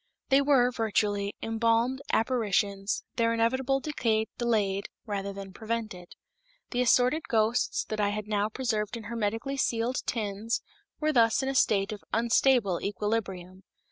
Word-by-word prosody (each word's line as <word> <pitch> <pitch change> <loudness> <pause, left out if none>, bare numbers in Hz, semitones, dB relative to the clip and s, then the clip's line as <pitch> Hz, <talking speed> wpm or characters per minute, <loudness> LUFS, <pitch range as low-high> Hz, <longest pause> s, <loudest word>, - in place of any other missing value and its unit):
They 270 0 +5
were, 270 -3 +4
virtually, 205 -3 0
embalmed 230 +3 +1
apparitions, 205 -4 0
their 230 -1 +2
inevitable 260 +4 +1
decay 225 -8 0
delayed, 205 -5 0 0.2
rather 200 -2 -3
than 195 -1 -8
prevented. 220 -6 -5 0.6
The 245 - 0
assorted 250 +5 +3
ghosts 225 +1 +1
that 215 - -4
I 205 - +2
had 210 0 -4
now 210 0 0
preserved 220 -2 -2
in 225 - -8
hermetically 225 +4 -2
sealed 240 0 0
tins 215 0 -2 0.4
were 310 0 +1
thus 230 0 +4
in 265 - -1
a - - -1
state 200 -5 +2
of 210 -2 -7
unstable 230 -4 +3
equilibrium. 195 -3 -3
225 Hz, 140 wpm, -28 LUFS, 205-245 Hz, 0.6 s, They